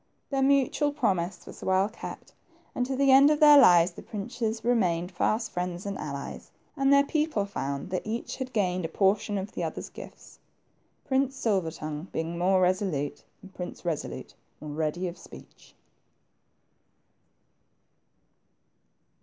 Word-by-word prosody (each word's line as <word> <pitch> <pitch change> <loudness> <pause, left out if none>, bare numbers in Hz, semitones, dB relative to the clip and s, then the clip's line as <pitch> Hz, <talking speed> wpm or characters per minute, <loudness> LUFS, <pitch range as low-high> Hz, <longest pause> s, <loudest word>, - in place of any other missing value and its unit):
Their 270 -1 0
mutual 280 +2 +2
promise 190 - -1
was - - -12
well 190 +1 +2
kept, 220 - -9 0.4
and 250 - -1
to 265 - -2
the 275 0 +3
end 275 +2 +8
of 300 -1 +2
their 295 -1 +9
lives 175 -8 +6
the - - -11
princes 220 +1 -4
remained 180 -7 +1
fast 220 +5 0
friends 180 +1 -4
and 200 -1 -3
allies, 140 -2 -6 0.3
and 275 -1 +2
their 280 0 +6
people 300 -8 0
found 140 -5 -4
that 185 - -1
each 225 +2 -4
had 260 -1 -5
gained 185 -5 0
a - - -1
portion 205 +4 +1
of 195 +1 -4
the - - -4
other's - - -5
gift. - - -12 0.7
Prince 270 0 +1
Silver 200 -10 0
tongue 155 0 -6
being 165 +1 -3
more 185 +2 +2
resolute, 180 -6 0 0.2
and 190 0 -13
Prince 180 -1 -7
Kesolute 170 -4 -4 0.3
more 150 -1 -7
ready 160 +4 -2
of 175 +1 -7
speech. - - -15
195 Hz, 145 wpm, -27 LUFS, 175-255 Hz, 0.7 s, their